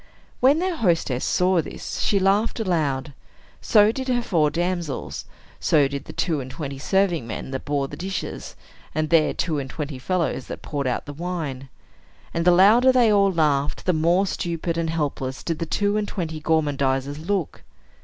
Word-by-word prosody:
When 275 +4 +5
their 360 0 -1
hostess 165 - +1
saw 180 -1 +2
this, - - -7
she 205 - +2
laughed 195 +5 +2
aloud; 150 -8 -1 0.5
so 210 -1 +5
did 260 +3 -5
her 245 -2 +1
four 160 -8 +2
damsels; 170 -2 -3 0.3
so 145 -3 +3
did 140 0 -6
the - - -8
two 165 -5 0
and 130 - -8
twenty 140 -2 -6
serving 175 -5 +1
men 115 +3 -6
that 130 - -5
bore 140 -1 0
the 145 - -8
dishes, 190 +4 -5 0.4
and 155 0 -1
their 165 -2 +4
two 160 -4 -1
and 135 -1 -5
twenty 145 -2 -5
fellows 170 -3 -1
that - - -7
poured 140 -3 -3
out 125 - -2
the 145 - -7
wine. 150 -5 -5 0.6
And 170 0 -1
the 180 - +7
louder 215 +8 +6
they 240 -4 +4
all 200 -1 +4
laughed, 150 -4 0
the 180 - +3
more 170 +5 +3
stupid 170 -2 -3
and 165 -1 -1
helpless 140 -4 -3
did 165 -2 -2
the 165 - -3
two 205 +4 +1
and 210 -1 -1
twenty 160 -6 -4
gormandizers 145 -3 0
look. 175 0 -2
165 Hz, 180 wpm, -23 LUFS, 145-190 Hz, 0.6 s, the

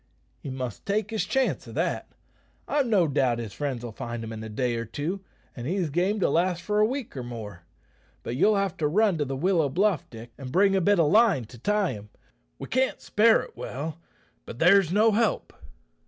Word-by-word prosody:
"He - - -7
must 130 -4 -6
take 210 +2 0
his 220 - -1
chance 265 -1 0
o' - - -9
that. - - -2 0.5
I've 285 -3 +1
no 195 -7 +3
doubt 130 -4 +1
his 115 -4 -6
friends'll 120 -1 -4
find 120 0 -6
him 115 0 -6
in 110 0 -7
a 110 - -7
day 120 +2 -1
or 115 - -2
two, 155 - -4 0.3
an' 120 - -7
he's 175 0 -1
game 185 +7 +1
to - - +3
last 175 +1 +1
for 210 +3 0
a 215 - +5
week 260 - -5
or 130 - -4
more. 110 -8 -8 0.6
But 120 - -4
you'll 210 +10 +4
have 195 -2 0
to 155 -3 +1
run 195 +1 +2
to 145 - +1
the 135 0 -4
willow 165 0 +2
bluff, 190 +3 +1
Dick, 115 0 -11
and 130 -2 -7
bring 195 +3 +4
a 190 - +2
bit 200 +1 +3
of 155 -3 +3
line 210 - +4
to 120 +2 -14
tie 205 - +1
him. 105 0 -9 0.5
We - - -7
can't 260 +1 0
spare 220 +1 +3
it - - -13
well; 155 +5 -5 0.5
but - - -8
there's 175 +2 +5
no 215 +3 +4
help." 220 +1 0
165 Hz, 215 wpm, -26 LUFS, 125-205 Hz, 0.6 s, a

